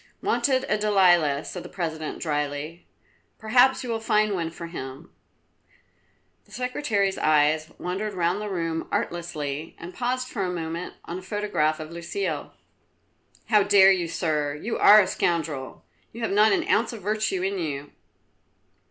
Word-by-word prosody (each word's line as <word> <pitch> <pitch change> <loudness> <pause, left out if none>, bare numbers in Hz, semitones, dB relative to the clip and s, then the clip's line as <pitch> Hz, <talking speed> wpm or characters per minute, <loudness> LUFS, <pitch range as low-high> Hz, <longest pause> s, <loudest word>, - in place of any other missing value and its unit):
"Wanted 260 -1 +1
a 210 - +1
Delilah," 175 -8 +3
said 180 - -6
the - - -10
President 160 -3 -4
dryly. 150 +1 -3 0.5
"Perhaps 250 +4 +3
you 250 - -6
will 225 - -1
find 215 -1 +2
one 170 -3 -2
for 170 +1 -8
him." 135 -3 -8 1.3
The - - -24
Secretary's 240 -6 -1
eyes 155 +1 +3
wandered 195 +3 -4
round 180 +3 0
the 210 - -4
room 165 -3 -2
artlessly, 160 -3 -3
and 175 +2 -9
paused 255 +1 -2
for 225 - -4
a 185 - -1
moment 170 0 -5
on 175 +2 -5
a - - -11
photograph 185 -6 -1
of 155 0 -7
Lucile. 170 - -4 1.0
"How 210 -2 +5
dare 195 -1 +6
you, 180 -3 +1
Sir! 150 -4 -1
You 220 +10 -4
are 210 +1 +9
a - - +1
scoundrel! 155 -8 -2 0.3
You 235 - -8
have 225 - -1
not 210 +2 +5
an - - +1
ounce 225 +2 +2
of 220 -5 -9
virtue 210 -2 -1
in 195 0 -1
you!" 145 -3 -4
180 Hz, 155 wpm, -25 LUFS, 160-210 Hz, 1.3 s, are